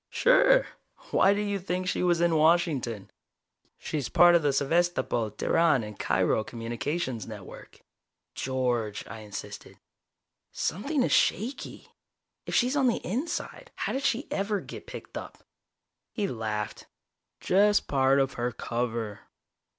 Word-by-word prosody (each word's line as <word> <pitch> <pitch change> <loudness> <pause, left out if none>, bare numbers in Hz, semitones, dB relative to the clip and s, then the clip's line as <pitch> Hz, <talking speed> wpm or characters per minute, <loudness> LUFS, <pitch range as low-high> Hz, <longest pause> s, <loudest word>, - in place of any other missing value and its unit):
"Sure. - - +4 0.5
Why 200 +1 +4
did 205 0 -1
you 200 -1 -1
think 185 0 -3
she 180 - 0
was 175 -1 +2
in 170 -1 +3
Washington? 155 - +1 0.7
She's 145 -4 -4
part 175 0 +6
of 170 - +5
the 145 -2 +2
Sevastopol, 140 -5 +1
Teheran 150 +4 +2
and 105 -1 -9
Cairo 95 +3 +1
communications 120 +3 -4
network." 105 -4 -11 0.5
"George," 125 -5 -2
I 110 - -9
insisted. 105 -2 -9 0.7
"Something 270 - -1
is - - 0
shaky. 245 +7 0 0.6
If - - -2
she's 250 +3 +2
on 270 -3 +3
the 235 - 0
inside, 260 - -4
how - - -2
did 270 - -1
she 275 +1 0
ever 200 +1 -1
get - - -10
picked - - -7
up?" - - -12 0.7
He 210 -3 -2
laughed. 110 - -4 0.5
"Just 205 +2 +3
part 135 0 +3
of 135 -1 +1
her 120 +1 -2
cover. 115 -3 -3
155 Hz, 135 wpm, -28 LUFS, -, 0.7 s, part